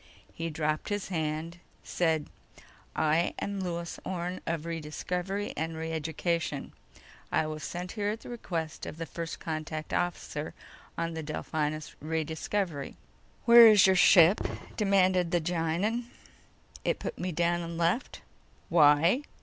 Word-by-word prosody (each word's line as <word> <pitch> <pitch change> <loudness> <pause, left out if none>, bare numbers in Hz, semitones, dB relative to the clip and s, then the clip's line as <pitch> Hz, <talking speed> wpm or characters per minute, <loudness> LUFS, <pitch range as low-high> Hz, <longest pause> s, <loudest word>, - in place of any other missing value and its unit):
_ - - -27 0.3
He 165 0 -3
dropped 155 0 -1
his 205 -2 -2
hand, 160 0 -3 0.2
said: 160 -3 0 0.7
"I 160 +2 +2
am 200 0 -3
Lewis 170 -2 -4
Orne 180 0 -3
of 165 -1 -2
Rediscovery 180 +5 -3
and 160 +1 -3
Reeducation. 160 -1 -2 0.6
I - - +2
was 155 0 -5
sent 180 +1 -5
here 205 -2 -1
at 220 +2 -3
the - - -10
request 170 -9 -4
of - - -7
the 165 - -4
First 165 +1 -6
Contact 155 -1 -4
officer 165 -3 -2 0.4
on 165 0 -2
the 160 - -4
Delphinus 155 0 -3
Rediscovery." 160 +1 -2 0.5
"Where 235 -1 +10
is 210 -3 +7
your 190 0 +5
ship?" 180 0 +7 0.3
demanded 185 -3 +3
the 175 - +2
Gienahn. 175 +8 -1 0.8
"It - - +1
put - - -6
me 180 +1 -2
down 175 +1 +1
and 170 0 -5
left." 170 +9 0 0.5
"Why?" 165 - +5
170 Hz, 135 wpm, -29 LUFS, 160-185 Hz, 0.8 s, Where